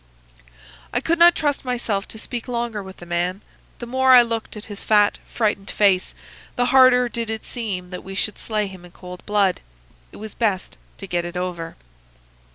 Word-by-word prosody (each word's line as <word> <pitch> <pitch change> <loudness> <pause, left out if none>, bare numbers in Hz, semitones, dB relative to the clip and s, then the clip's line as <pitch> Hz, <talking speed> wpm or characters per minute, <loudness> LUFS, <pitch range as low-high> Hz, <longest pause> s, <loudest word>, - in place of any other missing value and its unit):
"I 245 - +1
could 330 +5 0
not 345 +1 +8
trust 290 -2 0
myself 235 -6 -2
to - - -8
speak 235 +2 -6
longer 235 -3 -2
with 190 0 -11
the 175 - -11
man. 175 +3 -1 0.4
The 240 - -7
more 260 +2 +4
I 245 -1 +9
looked 230 -2 -4
at 210 - -9
his 205 -2 -8
fat, 210 -1 +3
frightened 210 -3 -1
face, 195 -3 +2 0.4
the 245 - +2
harder 255 -2 +6
did 230 -1 -4
it 220 -1 -4
seem 195 -7 -4
that 180 - -7
we 195 0 -8
should 210 +1 -2
slay 215 -2 -1
him 190 -2 -10
in 175 0 -15
cold 180 -1 -10
blood. 205 -3 +2 0.5
It - - -12
was 215 0 -8
best 205 -5 -1 0.2
to 195 - -7
get 175 -2 -1
it 175 +1 -6
over. 175 -2 -4
210 Hz, 190 wpm, -22 LUFS, 185-240 Hz, 0.5 s, I